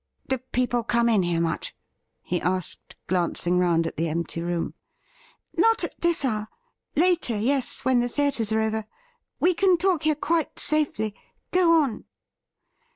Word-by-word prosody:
' -, -, -40 dB
Do 265 Hz, -1 st, +1 dB
people 250 Hz, -1 st, -1 dB
come 235 Hz, +1 st, +2 dB
in 215 Hz, -4 st, +4 dB
here 175 Hz, -2 st, 0 dB
much? 165 Hz, -1 st, -2 dB, 0.5 s
he 175 Hz, -1 st, -2 dB
asked, 185 Hz, 0 st, -3 dB
glancing 175 Hz, 0 st, 0 dB
round 170 Hz, -2 st, +2 dB
at 165 Hz, -, -5 dB
the 165 Hz, +1 st, 0 dB
empty 165 Hz, +1 st, -3 dB
room. 170 Hz, 0 st, -2 dB, 0.8 s
'Not 455 Hz, 0 st, +3 dB
at -, -, -5 dB
.this 340 Hz, -4 st, +1 dB
hour; 215 Hz, -4 st, -1 dB, 0.5 s
later, 335 Hz, -8 st, +2 dB
yes, 260 Hz, +5 st, -1 dB
when 260 Hz, -1 st, +4 dB
the 245 Hz, 0 st, 0 dB
theatres 260 Hz, -5 st, -1 dB
are 220 Hz, 0 st, +2 dB
over. 220 Hz, -1 st, -1 dB, 0.5 s
We 360 Hz, -, +4 dB
can 370 Hz, 0 st, +3 dB
talk 360 Hz, -2 st, +1 dB
here 310 Hz, -1 st, +2 dB
quite 325 Hz, +2 st, -1 dB
safely. 280 Hz, -9 st, 0 dB, 0.4 s
Go 360 Hz, -2 st, +4 dB
on.' 245 Hz, -7 st, -4 dB
235 Hz, 155 wpm, -25 LUFS, -, 0.8 s, in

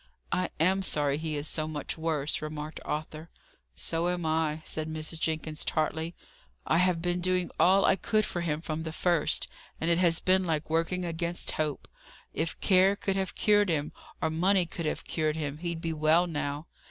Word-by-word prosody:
"I 180 Hz, -1 st, 0 dB
am 185 Hz, +4 st, +3 dB
sorry 145 Hz, -5 st, +1 dB
he 155 Hz, -1 st, -2 dB
is 145 Hz, +1 st, -2 dB
so 155 Hz, 0 st, -1 dB
much 150 Hz, -3 st, -3 dB
worse," 155 Hz, -3 st, 0 dB
remarked 155 Hz, 0 st, -5 dB
Arthur. 155 Hz, +2 st, -4 dB, 0.5 s
"So 165 Hz, -, 0 dB
am 175 Hz, -2 st, -2 dB
I," 155 Hz, -1 st, 0 dB
said 155 Hz, 0 st, -2 dB
Mrs. 155 Hz, +1 st, -4 dB
Jenkins, 155 Hz, -1 st, -2 dB
tartly. 160 Hz, +2 st, -1 dB, 0.5 s
"I 165 Hz, -, +3 dB
have 180 Hz, -2 st, +2 dB
been 175 Hz, 0 st, 0 dB
doing 185 Hz, 0 st, +1 dB
all 195 Hz, +2 st, +5 dB
I 195 Hz, -, +4 dB
could 215 Hz, +1 st, +1 dB
for 175 Hz, -, -3 dB
him 155 Hz, -2 st, -1 dB
from 160 Hz, -1 st, -3 dB
the 160 Hz, 0 st, -4 dB
first, 170 Hz, -1 st, +1 dB, 0.3 s
and 165 Hz, +1 st, +1 dB
it 170 Hz, -, +3 dB
has 170 Hz, -2 st, +3 dB
been 185 Hz, 0 st, +3 dB
like 160 Hz, -3 st, -2 dB
working 165 Hz, +3 st, 0 dB
against 170 Hz, +1 st, -2 dB
hope. 155 Hz, -2 st, -2 dB, 0.5 s
If 165 Hz, +1 st, -2 dB
care 190 Hz, 0 st, +5 dB
could 195 Hz, -1 st, -1 dB
have 190 Hz, -1 st, -2 dB
cured 205 Hz, -2 st, +4 dB
him, 150 Hz, -3 st, 0 dB, 0.3 s
or 160 Hz, -, 0 dB
money 180 Hz, +3 st, +3 dB
could 170 Hz, -1 st, -4 dB
have -, -, -2 dB
cured 155 Hz, -2 st, 0 dB
him, 150 Hz, -2 st, -4 dB
he'd 170 Hz, -1 st, -3 dB
be 165 Hz, -1 st, -2 dB
well 155 Hz, +3 st, +4 dB
now. 145 Hz, -2 st, -3 dB
165 Hz, 190 wpm, -29 LUFS, 155-180 Hz, 0.5 s, all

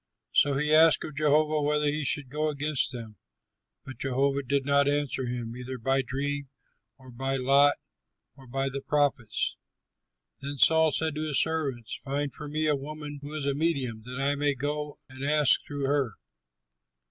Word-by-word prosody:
So 140 Hz, -1 st, +4 dB
he 150 Hz, +2 st, +1 dB
asked 160 Hz, 0 st, +6 dB
of 155 Hz, -, -7 dB
Jehovah 150 Hz, +1 st, +2 dB
whether 150 Hz, +1 st, +1 dB
he 150 Hz, +1 st, 0 dB
should 140 Hz, -1 st, +1 dB
go 155 Hz, +1 st, 0 dB
against 145 Hz, -2 st, 0 dB
them, 115 Hz, -4 st, -8 dB, 0.7 s
but 135 Hz, -3 st, -10 dB
Jehovah 135 Hz, +1 st, 0 dB
did 140 Hz, +1 st, -1 dB
not 140 Hz, 0 st, +3 dB
answer 145 Hz, -3 st, -1 dB
him 120 Hz, -1 st, -4 dB
either 125 Hz, +1 st, -6 dB
by 135 Hz, +3 st, +1 dB
dream 140 Hz, +2 st, -3 dB, 0.5 s
or 130 Hz, -2 st, -14 dB
by 135 Hz, +3 st, -2 dB
lot 140 Hz, +2 st, +4 dB, 0.6 s
or 135 Hz, -1 st, -16 dB
by 135 Hz, +2 st, -2 dB
the 135 Hz, +1 st, -5 dB
prophets. 140 Hz, -7 st, 0 dB, 0.8 s
Then 140 Hz, +1 st, -5 dB
Saul 160 Hz, +3 st, +5 dB
said 160 Hz, +2 st, 0 dB
to 155 Hz, +1 st, -3 dB
his 145 Hz, -3 st, +2 dB
servants, 140 Hz, -8 st, -1 dB
"Find 140 Hz, 0 st, -2 dB
for 150 Hz, +1 st, -4 dB
me 155 Hz, +2 st, -1 dB
a 150 Hz, -1 st, +3 dB
woman 145 Hz, +1 st, -7 dB
who 145 Hz, +2 st, -6 dB
is 150 Hz, -3 st, -3 dB
a 140 Hz, -, +1 dB
medium, 140 Hz, -7 st, -1 dB
that 125 Hz, +2 st, -6 dB
I 140 Hz, +1 st, +2 dB
may 145 Hz, 0 st, 0 dB
go 145 Hz, +2 st, -3 dB
and 130 Hz, 0 st, -10 dB
ask 150 Hz, 0 st, +4 dB
through 145 Hz, -1 st, -3 dB
her." 135 Hz, -6 st, 0 dB
140 Hz, 175 wpm, -28 LUFS, 135-150 Hz, 0.8 s, asked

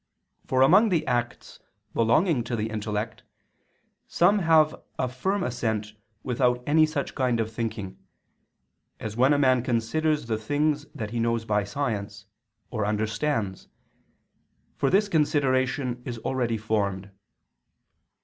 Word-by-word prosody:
For 130 Hz, 0 st, +3 dB
among 195 Hz, +11 st, +6 dB
the 165 Hz, -5 st, +1 dB
acts 120 Hz, -2 st, -3 dB, 0.3 s
belonging 120 Hz, -, +2 dB
to 120 Hz, -, -2 dB
the 110 Hz, 0 st, -3 dB
intellect, 105 Hz, 0 st, -3 dB, 0.9 s
some 200 Hz, +4 st, +3 dB
have 160 Hz, -3 st, +4 dB, 0.2 s
a 130 Hz, -, 0 dB
firm 185 Hz, +11 st, -1 dB
assent 110 Hz, -3 st, -2 dB, 0.3 s
without 125 Hz, -1 st, +1 dB
any 155 Hz, +1 st, +4 dB
such 150 Hz, -2 st, -3 dB
kind 125 Hz, -3 st, 0 dB
of 110 Hz, 0 st, -1 dB
thinking, 110 Hz, -4 st, -4 dB, 1.0 s
as 110 Hz, -1 st, -5 dB
when 130 Hz, +4 st, +4 dB
a 145 Hz, -, +4 dB
man 130 Hz, -3 st, +3 dB
considers 130 Hz, +6 st, 0 dB
the 110 Hz, -2 st, -2 dB
things 145 Hz, +5 st, 0 dB
that 110 Hz, -1 st, -5 dB
he 120 Hz, -, -2 dB
knows 115 Hz, 0 st, 0 dB
by 105 Hz, -2 st, +1 dB
science, 100 Hz, -4 st, -4 dB, 0.5 s
or 110 Hz, -4 st, -2 dB
understands, 110 Hz, 0 st, -1 dB, 1.1 s
for -, -, +1 dB
this 200 Hz, +2 st, +3 dB
consideration 130 Hz, -6 st, +1 dB
is 120 Hz, -2 st, -5 dB
already 120 Hz, -1 st, -1 dB
formed. 100 Hz, -3 st, -2 dB
120 Hz, 130 wpm, -26 LUFS, 110-145 Hz, 1.1 s, among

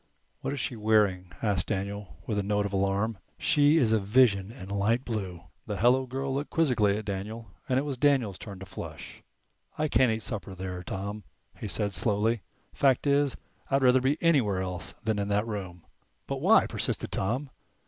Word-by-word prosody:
"What -, -, -3 dB
is 140 Hz, -, -3 dB
she 125 Hz, -, -2 dB
wearing?" 105 Hz, -5 st, +2 dB
asked 105 Hz, -3 st, +1 dB
Daniel, 100 Hz, 0 st, -4 dB
with 105 Hz, -3 st, -1 dB
a -, -, +2 dB
note 105 Hz, +1 st, 0 dB
of 100 Hz, -, -4 dB
alarm. 100 Hz, +2 st, 0 dB, 0.2 s
"She's 145 Hz, -4 st, +4 dB
a 110 Hz, -, +4 dB
vision 105 Hz, -1 st, +3 dB
in 115 Hz, -6 st, -10 dB
light 105 Hz, +5 st, +1 dB
blue." 95 Hz, -7 st, -4 dB, 0.2 s
The 105 Hz, -2 st, -3 dB
hello 130 Hz, +4 st, +3 dB
girl 135 Hz, +1 st, -3 dB
looked 140 Hz, +2 st, -2 dB
quizzically 115 Hz, -11 st, +2 dB
at 110 Hz, -, -5 dB
Daniel 105 Hz, +2 st, -5 dB, 0.2 s
and 130 Hz, -, +3 dB
it 135 Hz, -, +2 dB
was 140 Hz, -4 st, -4 dB
Daniel's 130 Hz, -9 st, +2 dB
turn 100 Hz, -3 st, -8 dB
to 95 Hz, -, -9 dB
flush. -, -, -8 dB, 0.6 s
"I 155 Hz, -, +1 dB
can't 125 Hz, -3 st, +3 dB
eat 110 Hz, 0 st, -2 dB
supper 100 Hz, -5 st, -5 dB
there, 90 Hz, -1 st, -5 dB
Tom," 100 Hz, +3 st, -5 dB, 0.3 s
he -, -, -6 dB
said, 100 Hz, 0 st, -1 dB
slowly. 105 Hz, +5 st, +1 dB, 0.3 s
"Fact 135 Hz, -1 st, +3 dB
is, 140 Hz, -1 st, +2 dB, 0.3 s
I'd 135 Hz, 0 st, +2 dB
rather 125 Hz, 0 st, +5 dB
be 135 Hz, +4 st, +2 dB
anywhere 120 Hz, -, +3 dB
else 90 Hz, -2 st, -5 dB
than 110 Hz, -2 st, 0 dB
in 100 Hz, -, -1 dB
that 105 Hz, +1 st, +1 dB
room." 95 Hz, -6 st, -6 dB, 0.4 s
"But -, -, -4 dB
why?" -, -, +6 dB
persisted -, -, -2 dB
Tom. 125 Hz, +8 st, -2 dB
110 Hz, 185 wpm, -28 LUFS, 100-130 Hz, 0.6 s, why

